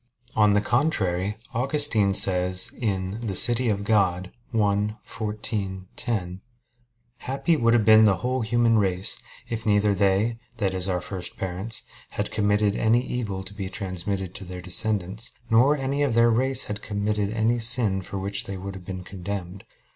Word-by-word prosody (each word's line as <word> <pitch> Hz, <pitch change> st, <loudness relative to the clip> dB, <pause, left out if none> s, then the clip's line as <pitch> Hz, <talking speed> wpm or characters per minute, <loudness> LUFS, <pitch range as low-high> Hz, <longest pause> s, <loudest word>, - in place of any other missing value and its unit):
On 105 Hz, -1 st, +4 dB
the 105 Hz, -, +3 dB
contrary, 105 Hz, -, 0 dB, 0.2 s
Augustine 120 Hz, -6 st, +2 dB
says 90 Hz, +3 st, +3 dB
(De 105 Hz, -3 st, -3 dB
Civ. 120 Hz, +4 st, +6 dB
Dei 125 Hz, 0 st, -1 dB, 1.0 s
xiv, 105 Hz, -1 st, -3 dB
10): 95 Hz, -5 st, -3 dB, 0.8 s
"Happy 140 Hz, +6 st, 0 dB
would 115 Hz, -5 st, +2 dB
have 110 Hz, -3 st, +2 dB
been 110 Hz, 0 st, +7 dB
the 100 Hz, -2 st, +4 dB
whole 125 Hz, +7 st, -2 dB
human 115 Hz, 0 st, +2 dB
race 95 Hz, -1 st, 0 dB, 0.3 s
if 115 Hz, -1 st, -4 dB
neither 105 Hz, -1 st, +2 dB
they 100 Hz, +4 st, +1 dB, 0.2 s
that 100 Hz, -4 st, 0 dB
is 95 Hz, 0 st, -1 dB
our 90 Hz, -1 st, -1 dB
first 90 Hz, 0 st, -6 dB
parents 95 Hz, +5 st, -3 dB, 0.3 s
had -, -, -1 dB
committed 105 Hz, 0 st, +1 dB
any 115 Hz, +3 st, +2 dB
evil 100 Hz, -6 st, -4 dB
to 95 Hz, +1 st, -8 dB
be 100 Hz, -2 st, -5 dB
transmitted 95 Hz, -1 st, -4 dB
to 100 Hz, -, -7 dB
their 90 Hz, 0 st, -8 dB
descendants, 100 Hz, +2 st, 0 dB, 0.2 s
nor 130 Hz, +6 st, +5 dB
any 135 Hz, +1 st, -2 dB
of 140 Hz, -6 st, +1 dB
their 115 Hz, 0 st, +5 dB
race 130 Hz, +3 st, +2 dB
had 105 Hz, 0 st, -5 dB
committed 105 Hz, 0 st, -2 dB
any 115 Hz, +2 st, +1 dB
sin 115 Hz, -4 st, +2 dB
for 100 Hz, -, -7 dB
which 100 Hz, +1 st, -2 dB
they 100 Hz, 0 st, -5 dB
would 100 Hz, +1 st, -6 dB
have 95 Hz, -2 st, -11 dB
been 95 Hz, -1 st, -6 dB
condemned." 95 Hz, 0 st, -6 dB
105 Hz, 155 wpm, -25 LUFS, 95-115 Hz, 1.0 s, been